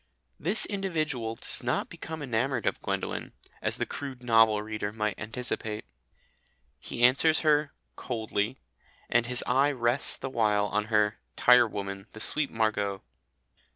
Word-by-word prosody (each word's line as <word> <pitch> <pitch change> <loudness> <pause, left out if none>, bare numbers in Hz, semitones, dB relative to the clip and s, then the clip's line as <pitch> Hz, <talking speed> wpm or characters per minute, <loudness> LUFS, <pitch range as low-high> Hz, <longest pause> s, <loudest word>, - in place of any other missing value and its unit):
This 195 +7 +1
individual 155 - -2
does - - -5
not - - -1
become 160 -2 -7
enamoured 130 +1 -1
of - - 0
Gwendolen, - - -3 0.3
as - - +1
the - - -1
crude 135 -3 -7
novel 110 -3 +4
reader 105 -1 -4
might 105 -2 -2
anticipate. 110 -1 -4 0.9
He 120 - -4
answers 145 +6 +5
her 150 -2 +3 0.2
"coldly," 110 0 -2 0.5
and 120 0 +3
his 125 -1 +3
eye 140 +3 +3
rests 120 0 +1
the - - -5
while 105 -4 +2
on 105 +1 -1
her 105 -1 +1 0.2
"tirewoman, 100 -5 +3
the 110 - -9
sweet 150 +5 +1
Margot." 105 -3 -1
115 Hz, 135 wpm, -28 LUFS, 105-135 Hz, 0.9 s, answers